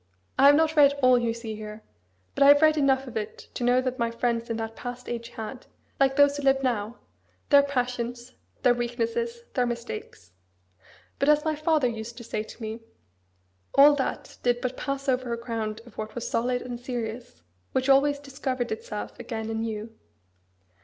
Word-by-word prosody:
I 275 - +8
have 290 - +8
not 320 +1 +2
read 285 -2 +6
all 255 -1 +6
you 235 -1 0
see 230 -1 -6
here. 215 0 -8 0.5
But - - -5
I - - +7
have 285 +2 +7
read 310 0 +6
enough 270 -2 +2
of 250 -3 -10
it 215 -1 -5
to - - -4
know 245 +1 +4
that 255 0 -3
my 235 0 +1
friends 235 0 -1
in 230 - -1
that 225 0 -5
past 245 0 -7
age 235 -1 -4
had, 235 +3 -8 0.3
like 270 -1 +3
those 285 0 +5
who 290 - -4
live 270 -1 +3
now, 230 -2 -1 0.5
their 285 -1 +8
passions, 245 -3 -3 0.3
their 250 -2 +6
weaknesses, 240 - -2
their 250 -2 +1
mistakes. 235 - -6 0.9
But, 280 - +2
as 300 +1 +4
my 315 - +1
father 305 -3 +2
used 230 0 -6
to 240 - -8
say 215 -2 -3
to 220 - -11
me, 220 +1 -4 1.0
all 285 +2 +8
that 265 - -4
did 245 0 +2
but 255 0 -3
pass 275 +1 -4
over 250 -2 0
a - - -2
ground 225 -2 -4
of 240 - -14
what 215 0 -5
was 240 - -4
solid 245 +1 0
and 245 -1 -6
serious, 235 - -6 0.3
which 260 0 0
always 280 +1 +4
discovered 270 -3 -4
itself 210 -1 -5
again 225 -2 -4
anew. 225 0 -4
245 Hz, 185 wpm, -26 LUFS, 230-275 Hz, 1.0 s, I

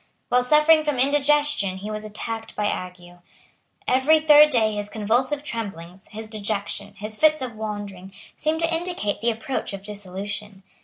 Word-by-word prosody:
While 250 0 +3
suffering 305 +4 +5
from 295 -3 -1
indigestion 285 -6 +2
he 205 +3 -6
was 215 0 -4
attacked 225 +1 -5
by 210 - -1
ague. 180 -2 -5 0.7
Every 265 +5 +4
third 300 -1 +7
day 220 -6 +2
his 205 0 -4
convulsive 245 +7 0
tremblings, 190 - -6
his 220 +1 -8
dejection, 205 -1 -4
his 215 +1 -6
fits 310 0 +4
of 250 -3 -5
wandering, 205 -3 -6 0.2
seemed 315 +2 -1
to 330 0 +1
indicate 330 - -3
the 235 - +2
approach 225 0 -3
of 195 0 -8
dissolution. 200 0 -7
220 Hz, 155 wpm, -23 LUFS, 205-290 Hz, 0.7 s, third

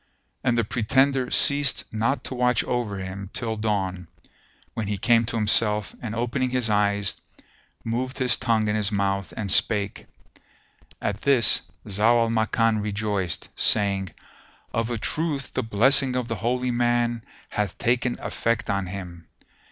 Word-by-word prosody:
And 120 -1 +1
the 115 - +2
pretender 130 +4 +1
ceased 140 -2 +4
not 115 +6 0
to - - -5
watch 125 -1 +1
over 120 -5 -2
him 95 +1 -7
till 115 -2 -2
dawn, 95 -5 -2 0.7
when 110 -3 -4
he 100 0 -2
came 115 +3 +3
to 115 - -3
himself 105 -1 +2
and, 115 -2 -5
opening 120 +2 -1
his 125 -3 0
eyes, 100 -1 +1 0.6
moved 125 +4 -3
his 125 -3 +3
tongue 110 -2 0
in 105 - 0
his 105 -1 0
mouth 100 -3 -1
and 100 -3 -1
spake. 105 -3 +2 0.9
At 105 +1 -3
this 130 -6 +4 0.2
Zau 110 +4 +3
al 115 - -1
Makan 110 0 +1
rejoiced, 105 -3 -2
saying, 100 -3 +2 0.6
"Of 115 0 -1
a 120 - -2
truth 150 +3 -2
the - - 0
blessing 130 +5 +3
of 125 -2 -2
the 115 -2 -3
Holy 125 +5 -1
Man 120 -1 0 0.3
hath 105 -3 -3
taken 120 +1 0
effect 115 -2 -1
on 100 -2 -2
him!" 90 -3 -8
115 Hz, 150 wpm, -24 LUFS, 100-120 Hz, 0.9 s, ceased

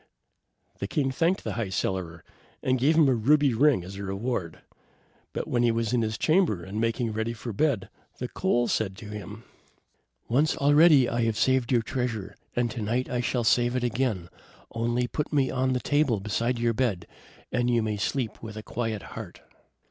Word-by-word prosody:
The 100 - -3
king 135 +3 0
thanked 170 +7 +1
the - - -3
High 115 -5 -2
Cellarer, 90 -3 -3 0.4
and 130 0 +1
gave 145 +6 +3
him 160 -3 +5
a 130 - +4
ruby 140 +4 +3
ring 135 -4 +3
as 95 +2 -8
a 100 - -5
reward. 95 -3 -3 0.7
But - - -4
when 120 - +1
he 120 - +4
was 115 0 0
in 120 - +3
his 110 -1 -2
chamber, 155 - +2
and 100 +4 -4
making 115 0 0
ready 110 +2 -2
for 115 0 -6
bed, 125 -3 +1 0.3
the 125 - -4
coal 120 -6 +1
said 95 -4 -1
to 110 -2 -9
him: 105 +1 -8 0.8
"Once 145 +7 +2
already 145 -1 +6
have 115 - -3
I 120 -1 +1
saved 130 +2 +1
your 120 -3 +3
treasure, 120 -5 -3 0.2
and 120 -1 +1
to 115 - -5
night 120 +5 -1
I 125 -1 0
shall 120 0 0
save 120 +2 +3
it 125 - 0
again. 115 -7 -1 0.4
Only 120 +2 0
put 150 +4 -3
me 140 -4 +2
on 130 0 +1
the 125 - 0
table 145 -5 +1
beside 115 +5 -1
your 115 0 +1
bed, 110 -7 -1 0.5
and 125 -1 +1
you 120 -2 +2
may 105 -1 -2
sleep 115 +2 -2
with 110 -1 -8
a 110 - -6
quiet 115 -3 -3
heart." - - -8
120 Hz, 195 wpm, -27 LUFS, 110-130 Hz, 0.8 s, already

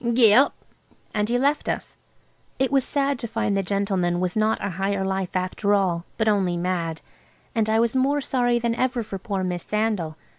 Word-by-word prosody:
Gee 230 -3 +6
up!" 270 +5 +5 0.6
And 210 0 0
he 245 - +2
left 285 +4 +1
us. - - -4 0.6
It 265 0 +1
was 270 -2 +3
sad 280 -1 0
to 235 - -4
find 225 -2 -1
the 195 - +2
gentleman 190 -3 0
was 180 -1 -1
not 215 +1 +2
a 200 - -3
Higher 195 +2 -1
Life 190 -1 -2
after 185 +3 +1
all, 180 -3 0
but 220 - 0
only 190 -5 +2
mad. 170 -2 -2 0.5
And 220 -3 +1
I 220 +1 +3
was 235 +1 +1
more 275 +3 +2
sorry 245 -3 +1
than 235 -1 0
ever 245 0 0
for 195 -2 -6
poor 195 -2 -3
Miss 180 -1 -2
Sandal. 210 -7 -1
210 Hz, 195 wpm, -24 LUFS, 185-240 Hz, 0.6 s, Gee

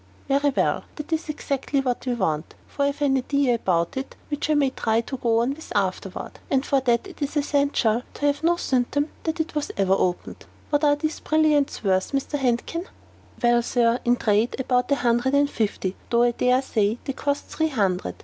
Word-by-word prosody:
"Very 280 +1 +2
well; 270 - 0
that 300 +1 -5
is 315 0 -2
exactly 280 -2 -1
what 255 -1 -2
we 245 - +1
want; 160 -8 -2
for - - -6
I - - +4
have 285 +1 -2
an 270 -1 +3
idea 275 0 +1
about 170 -7 0
it 265 0 -5
which 290 0 -2
I 305 - +3
may 280 -2 +2
try 225 -2 +1
to 265 +3 -6
go 230 -2 +2
on 245 +3 +1
with 315 +2 -12
afterward. 195 -1 -2
And 270 0 +1
for 275 -2 +2
that 240 +4 +1
it 370 -5 -12
is 285 +1 -2
essential 280 -6 +1
to 290 - -2
have 285 +1 +1
no 340 +1 +4
symptom 285 +2 0 0.2
that 325 +1 -2
it 320 +1 -1
ever 300 - -1
has 290 - -4
been 195 -1 0
opened. 185 -2 -1 0.3
What 290 0 +2
are 290 -1 +5
these 310 +1 -3
brilliants 305 -4 +2
worth, 190 +3 +1
Mr. 275 +1 -1
Handkin?" 270 +8 -1 0.6
"Well, 240 0 +4
Sir, 235 0 +2
in 240 0 +3
the - - -15
trade, 215 +2 +2
about 250 -1 +1
a - - +5
hundred 245 +1 +1
and 285 0 +4
fifty, 200 -3 -2
though 235 0 +3
I 240 - +4
dare 250 +2 +2
say 215 -3 0
they 275 - -3
cost 285 +1 -2
three 315 0 -1
hundred. 190 - -1
265 Hz, 215 wpm, -24 LUFS, 235-290 Hz, 0.6 s, are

